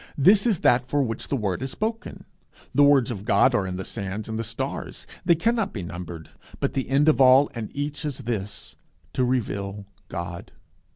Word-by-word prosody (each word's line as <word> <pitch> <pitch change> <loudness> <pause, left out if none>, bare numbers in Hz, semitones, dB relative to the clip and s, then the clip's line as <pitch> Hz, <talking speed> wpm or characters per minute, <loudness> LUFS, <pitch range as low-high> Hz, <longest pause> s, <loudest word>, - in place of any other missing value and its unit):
This 195 - +5
is 205 -8 +1
that 120 +1 +4
for 140 +3 0
which 115 -3 -4
the - - -1
word 100 -3 -2
is 135 - -3
spoken. 225 - -4 0.5
The 145 - +4
words 140 -4 +5
of 100 -4 -5
God 105 +6 +4
are 100 -5 +1
as 90 - -4
the 95 0 -5
sands 100 0 -5
and 110 0 -4
the - - -1
stars, 115 +1 -5 0.2
they 170 -1 +5
cannot 225 +3 0
be 100 - -4
numbered; 85 -2 -8 0.3
but - - -1
the 135 -2 -2
end 140 +3 +3
of 155 -3 +4
all 130 +2 +6
and 115 -3 -5
each 145 +1 -3
is 145 -3 -3
this 110 -6 -5 0.4
to 130 - +1
reveal 100 -5 -2 0.2
God. 85 -1 -6
125 Hz, 195 wpm, -25 LUFS, 100-145 Hz, 0.5 s, all